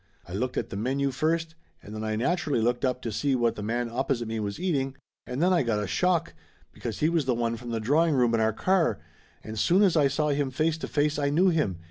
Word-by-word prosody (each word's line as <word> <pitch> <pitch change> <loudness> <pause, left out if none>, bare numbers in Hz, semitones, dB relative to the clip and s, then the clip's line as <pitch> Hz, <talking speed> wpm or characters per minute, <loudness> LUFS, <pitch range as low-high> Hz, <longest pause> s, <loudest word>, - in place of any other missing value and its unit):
I 90 - -9
looked 125 +6 -2
at - - -2
the - - -4
menu 135 +6 0
first, 160 +4 -1 0.3
and 105 - -10
then 110 0 -5
I 110 0 -1
naturally 145 +2 0
looked 120 +2 0
up 125 -1 0
to 115 - -3
see 135 +5 0
what 120 -2 +2
the 105 - -6
man 120 +3 -1
opposite 120 0 -2
me 110 0 -3
was 105 +4 -4
eating, 140 -7 -1 0.3
and 125 +6 -2
then 185 +1 +4
I 175 - +3
got 115 -5 0
a 105 - -1
shock, 170 - 0 0.4
because - - -6
he 155 - +4
was 165 -3 +1
the 125 -2 +1
one 115 0 -1
from 120 +1 -8
the 115 -1 -1
drawing 150 +7 +2
room 120 -3 +3
in 115 - +2
our 110 0 +2
car, 185 - +1 0.5
and 110 0 -6
soon 185 - +4
as 185 -4 +3
I 150 -3 +5
saw 150 +3 0
him 140 -1 0
face 155 +4 0
to - - -4
face 150 0 0
I 140 -1 +1
knew 175 +6 +4
him. 150 - 0
130 Hz, 255 wpm, -27 LUFS, 115-155 Hz, 0.5 s, I